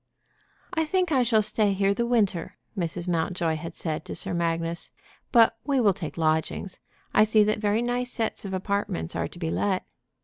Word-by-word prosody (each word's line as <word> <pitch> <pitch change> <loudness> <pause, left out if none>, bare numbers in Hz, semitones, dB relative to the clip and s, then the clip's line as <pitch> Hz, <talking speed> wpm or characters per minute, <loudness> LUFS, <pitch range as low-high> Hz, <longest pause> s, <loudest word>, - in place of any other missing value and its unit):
"I 320 -2 +2
think 360 +2 0
I 265 -3 +4
shall 225 -3 +3
stay 210 -1 +2
here 195 +1 +2
the 235 +3 -1
winter," 205 -8 0 0.2
Mrs. 175 -1 -3
Mountjoy 170 -1 0
had 165 +2 -7
said 155 -3 -3
to - - -6
Sir - - -1
Magnus, 165 0 -1 0.4
"but 230 -2 +6
we 275 -2 +1
will 210 -5 +4
take 170 -4 -6
lodgings. 160 +3 0 0.3
I - - +6
see 215 0 +5
that 215 0 +1
very 210 +2 +1
nice 245 +1 -1
sets 225 -2 -2
of 195 - -5
apartments 190 - -2
are 85 0 -1
to - - -14
be 165 -2 -2
let." 195 -2 0
200 Hz, 190 wpm, -26 LUFS, 170-225 Hz, 0.4 s, but